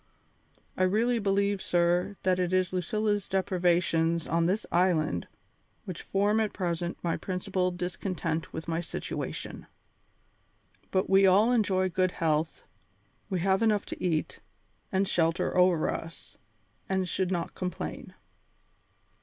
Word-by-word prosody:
I - - -3
really 225 +6 +2
believe, 200 -1 +1
sir, 175 +3 +1
that 185 -1 +2
it 180 -1 0
is 185 -1 +1
Lucilla's 205 +3 -1
deprivations 175 -3 +1
on 165 +1 +1
this 205 +4 0
island 165 - +1 0.6
which 185 - -6
form 205 +3 +1
at 215 -2 0
present 175 -1 -2
my 170 -1 0
principal 185 0 -1
discontent 180 -2 -3
with 160 - -6
my 165 0 -1
situation. 165 - -5 1.2
But 190 +1 +1
we 195 0 +5
all 205 +6 +5
enjoy 195 -6 +2
good 185 0 +1
health, 155 -1 -1 0.7
we 185 -4 -1
have 190 +2 +2
enough 215 -2 +2
to - - -7
eat, 165 -4 -1 0.5
and 190 +1 +1
shelter 165 -2 +1
over 180 -3 +3
us, 165 0 -8 0.5
and 190 -1 0
should 185 +1 -1
not 175 -3 -2
complain." 180 -2 -5
185 Hz, 130 wpm, -28 LUFS, 170-195 Hz, 1.2 s, we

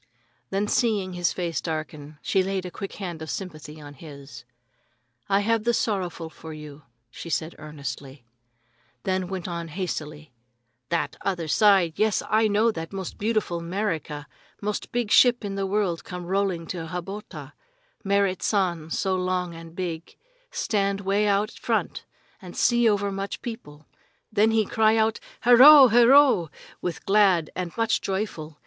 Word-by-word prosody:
Then 200 +2 -1
seeing 205 -5 0
his 175 -1 0
face 170 -3 -3
darken, 155 -2 -5
she 190 - +2
laid 190 0 -2
a 180 - -6
quick 195 +1 -7
hand 175 -5 -6
of 160 - -6
sympathy 155 -3 -7
on 145 -1 -11
his. 140 -4 -12 0.8
"I 200 0 +3
have 225 +1 +1
the 235 +1 +2
sorrowful 180 -7 -2
for 160 0 -10
you," 150 -1 -10 0.3
she 165 +3 -9
said 160 +3 -2
earnestly, 140 -3 -8 0.8
then 185 -1 -1
went 190 -1 -5
on 170 -1 -4
hastily: 155 -4 -5 0.6
"That 170 - -1
other 180 -4 -2
side! 190 -2 +3
Yes, 215 -1 +2
I 220 +1 +3
know 215 +2 +3
that 165 -5 -6
most 190 -2 -6
beautiful 210 -5 -1
'Merica. 170 -5 -3 0.3
Most 210 0 -4
big 240 -3 -1
ship 245 -3 +5
in 200 - -4
the 195 0 -2
world 190 -4 -1
come 180 -1 -7
rolling 190 -1 0
into 165 0 -6
Hatoba. 180 -4 -7 0.5
Merrit 200 -2 +1
San 175 -6 0
so 190 +3 0
long 180 -1 -1
and 165 0 -11
big, 170 -2 -5 0.3
stand 200 - -1
way 200 +2 +1
out 205 +1 +1
front - - -2 0.4
and - - -10
see 240 -1 +4
over 200 -1 0
much 195 +1 -5
people. 150 -11 -8 0.5
Then 215 +1 +4
he 220 -1 +2
cry 220 +2 +3
out, 220 0 +1 0.3
'Herro!' 260 +3 +9
herro!' 240 - +5 0.3
with 175 -3 -4
glad 195 -6 +3
and 180 -1 -3
much 230 0 +1
joyful. 190 -6 -4
185 Hz, 155 wpm, -25 LUFS, 165-210 Hz, 0.8 s, Herro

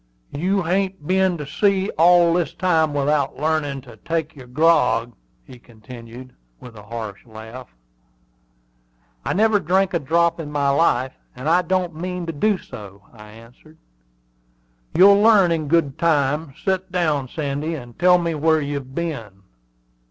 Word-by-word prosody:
"You 185 +5 -1
hain't 190 -1 -1
been 185 0 +1
to 150 - -6
sea 195 +5 0
all 170 +1 +4
this 175 -1 -1
time 160 -4 +1
without 145 -1 0
learnin' 145 -2 -1
to 120 -4 -15
take 160 +5 -3
your 130 -3 -12
grog?" 125 -5 +2 0.3
he 125 - -14
continued, 120 +2 -12 0.3
with 125 -2 -13
a 105 - -11
coarse 105 -2 -7
laugh. 110 +3 -11 1.6
"I - - -2
never 215 +1 +3
drank 190 +2 +1
a 170 - +1
drop 170 +3 +1
in 150 -2 -6
my 145 -1 0
life, 135 -3 +1 0.2
and 130 +4 -6
I 175 +3 +4
don't 180 -1 -1
mean 180 +2 -5
to 165 - -4
do 205 +7 +1
so," 100 - -12
I 105 -2 -14
answered. 115 +8 -17 1.2
"You'll 200 +2 +7
learn 210 -5 +5
in 160 -3 -1
good 145 -3 +1
time. 150 -2 0
Set 190 -1 -1
down, 155 -7 0
Sandy, 150 +3 -3
and 120 -5 -11
tell 180 0 +5
me 170 -1 -2
where 160 +1 +2
you've 140 -2 -5
been." 115 - -5
155 Hz, 150 wpm, -21 LUFS, 130-175 Hz, 1.6 s, You'll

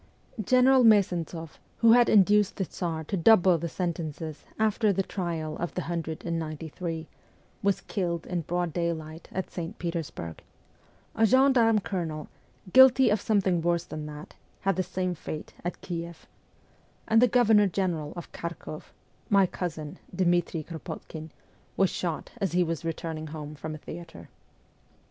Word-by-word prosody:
General 255 +3 +5
Me'zentsoff, 175 -7 +2 0.2
who 230 -1 +6
had 240 0 +6
induced 205 0 +5
the 190 - -1
Tsar 165 -2 -4
to 175 - -3
double 185 -2 +5
the 170 +1 -3
sentences 160 -3 -4
after 215 0 +2
the 195 0 0
trial 165 -5 -3
of 175 - -4
the 180 - -2
hundred 165 -2 -4
and 170 -1 -1
ninety 155 0 -5
three, 165 -1 -5 0.5
was 200 -1 +1
killed 170 -4 -2
in 180 -2 -2
broad 175 0 -2
daylight 165 -1 -3
at 190 - -4
St. 175 +4 -5
Petersburg; 165 - -5 0.7
a 225 0 +4
gen 265 +4 +5
darme 225 -4 +4
colonel, 160 -5 -4 0.4
guilty 260 -2 +7
of 210 - +1
something 190 -5 +2
worse 170 0 +1
than 155 -3 -6
that, 150 0 -9 0.3
had 195 -1 +1
the 185 - +1
same 185 0 -2
fate 155 -1 -7
at 175 - -4
Kieff; 170 -1 -6 0.8
and 225 +1 +5
the 250 - +7
Governor 220 -3 +5
General 170 -5 -1
of 175 - -8
Kharkoff 165 -2 -7 0.4
my 200 -2 +5
cousin, 160 -5 -5 0.2
Dmitri 175 -3 +1
Kropotkin 160 0 -8 0.5
was 195 -1 +3
shot 170 -3 -3
as 190 -4 0
he 180 0 +4
was 165 -1 -3
returning 160 -1 -4
home 150 -1 -7
from 155 +1 -6
a - - -7
theatre. 165 +2 -10
175 Hz, 155 wpm, -28 LUFS, 160-195 Hz, 0.8 s, guilty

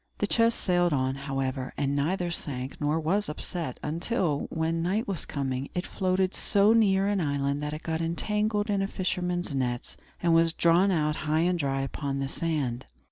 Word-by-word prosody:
The - - +1
chest 230 +2 +2
sailed 175 -2 +2
on, 130 -1 +1
however, 135 -2 -3
and 140 -1 0
neither 175 +5 0
sank 135 -5 -4
nor 150 +2 +1
was 185 +6 0
upset; 155 -2 -5
until, 165 -1 -1
when 165 0 -1
night 195 +7 0
was 195 -5 -3
coming, 135 -1 -2
it 180 - -1
floated 185 0 0
so 205 +2 +4
near 195 -4 +4
an 205 -2 +1
island 140 -1 0
that 150 0 -3
it 155 - -9
got 160 0 -2
entangled 210 +5 0
in 200 -1 +1
a 195 - 0
fisherman's 180 -4 -2
nets, 125 -3 -2 0.2
and 170 -1 +2
was 165 0 +4
drawn 170 +4 +4
out 150 -4 +1
high 155 +1 +1
and 175 0 +1
dry 135 -2 0
upon 135 0 -3
the 135 0 -1
sand. 140 -6 -2
165 Hz, 185 wpm, -28 LUFS, 140-185 Hz, 0.2 s, so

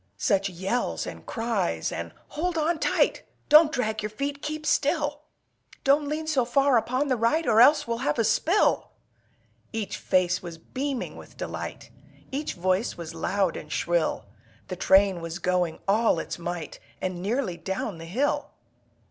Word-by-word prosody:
Such 200 -5 +1
yells 190 +7 -2
and - - -9
cries! 220 - -1
and 85 0 -5 0.2
"Hold 340 +2 -2
on 320 +1 +1
tight! - - +2 0.3
Don't 305 +1 +8
drag 220 -7 -1
your 210 - -3
feet! 280 +6 -4
Keep 305 0 -4
still! 290 0 +1 0.6
Don't 285 +2 +3
lean 305 +2 -2
so 300 -5 +2
far 275 +2 +3
upon 255 +5 +1
the 260 - +2
right, 245 +8 +1
Or 225 -1 +5
else 285 0 +6
we'll 230 0 -2
have 150 - 0
a 230 - +3
spill!" 345 - +2 0.8
Each 220 -3 -3
face 180 -1 +1
was 170 -2 -8
beaming 265 - -4
with - - -13
delight, - - -6 0.4
Each 290 +3 -3
voice 185 +5 0
was 170 -1 -7
loud 180 +2 0
and 150 - -8
shrill, 175 -1 0 0.4
The 185 - -3
train 190 -1 +4
was 165 0 -5
going 180 -3 0
all 215 0 +3
its 165 - -4
might 170 -2 -5 0.2
And 185 -1 -3
nearly 210 -1 -1
down 190 +1 -4
the 165 - -8
hill. 245 +13 0
225 Hz, 160 wpm, -26 LUFS, 180-285 Hz, 0.8 s, Don't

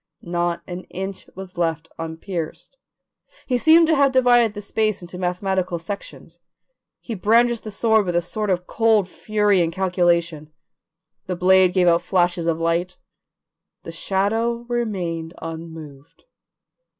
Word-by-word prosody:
Not 175 0 -2
an 180 0 -7
inch 190 +1 -7
was 185 -2 -9
left 165 -1 -1
unpierced. 165 - -6 0.7
He 250 -2 0
seemed 320 +4 +6
to 320 0 +3
have 280 -1 +4
divided 245 -4 +4
the 205 - -5
space 215 -2 -1
into 175 +1 -9
mathematical 180 0 -1
sections. 170 -1 -8 0.6
He 230 - -6
brandished 230 +3 +2
the 215 - -6
sword 220 0 +2
with 175 - -1
a 175 - +3
sort 210 +4 -3
of 180 -1 0
cold 220 -3 +2
fury 210 -2 +1
and 165 -1 0
calculation; 170 -4 0 0.8
the 185 - -2
blade 185 +1 +4
gave 180 -2 +3
out 170 0 +4
flashes 175 -2 0
of 165 -1 0
light, 170 +2 -1 0.9
the - - -7
shadow 225 +5 -1
remained 180 -9 -3
unmoved. 160 -3 -9
185 Hz, 140 wpm, -22 LUFS, 170-215 Hz, 0.9 s, seemed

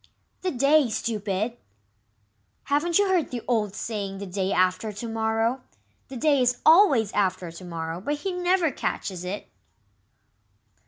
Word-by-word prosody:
"The 370 - 0
day 275 -1 +3
stupid! 215 +1 -2 1.1
Haven't 310 +4 +1
you 405 0 +3
heard 365 -5 +1
the 245 -2 -5
old 215 -5 0
saying, 200 -2 -4
'The 200 - -6
day 190 +1 -2
after 185 +4 +1
to 210 +3 -6
morrow'? 225 +3 0 0.5
The 265 - -8
day 285 0 +3
is 245 0 +2
always 310 - +6
after 185 -3 0
to 170 +3 -11
morrow, 165 0 -5
but 290 +8 -1
he 375 +6 -4
never 360 -2 +1
catches 185 -7 -4
it." 185 +3 -5
225 Hz, 145 wpm, -25 LUFS, 195-290 Hz, 1.1 s, always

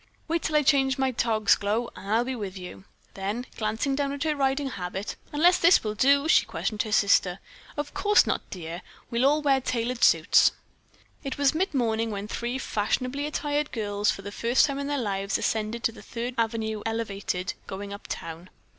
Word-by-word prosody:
Wait 330 +1 0
until 310 - -2
I 300 - +4
change 270 -2 +3
my 265 -1 +1
togs, 220 -3 +2
Glow, 220 +4 -1
and 195 - -9
I'll 225 +3 +3
be 260 0 -3
with 200 -4 -5
you." 180 +1 -9 0.3
Then, 205 +6 -3
glancing 220 +5 -1
down 280 0 -1
at 285 - -3
her 310 -1 0
riding 275 0 0
habit, 190 +1 -5 0.2
"Unless 345 +5 +4
this 340 +2 +5
will 215 -1 -2
do?" 280 +6 +3
she - - +5
questioned 215 -2 -2
her 215 - -4
sister. 200 -3 +3 0.4
"Of 290 0 -4
course 415 +1 +4
not, - - 0
dear. 170 -1 -6 0.3
We'll 240 +3 +3
all 300 +2 +2
wear 270 -2 +3
tailored 240 0 -2
suits." - - +5 0.7
It 275 - -4
was 285 0 +3
midmorning 240 - 0
when 205 -1 -4
three 240 +3 -3
fashionably 255 +4 -1
attired 295 0 -1
girls 205 -2 -1
for 195 - -2
the 205 - -6
first 235 +4 +3
time 280 -1 -3
in 280 - -3
their 290 0 -1
lives 195 -5 -1
ascended 220 +1 -2
to - - +2
the 230 - -13
Third 240 +1 -5
Avenue 220 -2 -1
Elevated, 200 -5 -3
going 200 +1 -6
uptown. 170 -3 -7
235 Hz, 190 wpm, -26 LUFS, 205-280 Hz, 0.7 s, this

